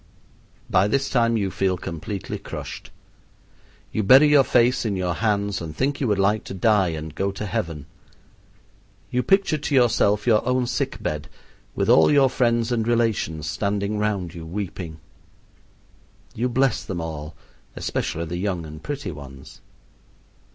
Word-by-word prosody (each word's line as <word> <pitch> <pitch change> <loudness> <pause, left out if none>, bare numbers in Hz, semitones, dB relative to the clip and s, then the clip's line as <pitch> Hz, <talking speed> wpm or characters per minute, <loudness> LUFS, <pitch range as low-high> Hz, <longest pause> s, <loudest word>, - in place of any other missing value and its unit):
By 95 +1 +3
this 135 +5 0
time 115 -2 +2
you 100 -3 -1
feel 95 -1 0
completely 85 +4 -5
crushed. - - -8 1.0
You 110 - 0
bury 130 +9 +7
your 145 -2 +6
face 125 0 +3
in 105 -4 -1
your 90 -2 -1
hands 100 -1 0
and 80 -2 -6
think 140 +2 -1
you 130 - +1
would 105 -2 +1
like 100 +2 +2
to - - -6
die 100 0 +3
and 80 -2 -5
go 100 +4 -1
to 100 +2 -6
heaven. 80 -6 -3 1.3
You 125 - +1
picture 195 -2 +2
to 145 0 -1
yourself 110 -4 +3
your 110 -3 +4
own 125 0 +1
sick - - -3
bed, 75 -1 -3 0.5
with - - 0
all - - +6
your 140 -3 +4
friends 120 -2 +1
and 115 -2 0
relations 110 -10 0
standing 100 +3 -1
round 100 -5 -1
you 85 -2 -8
weeping. 85 -2 -5 1.4
You 125 +3 -1
bless 130 0 +1
them 90 -3 -4
all, 80 -1 -6 0.4
especially 85 +1 -2
the 85 +2 -4
young 90 -3 -2
and 75 0 -10
pretty 140 - -4
ones. 70 0 -12
100 Hz, 155 wpm, -23 LUFS, 85-120 Hz, 1.4 s, bury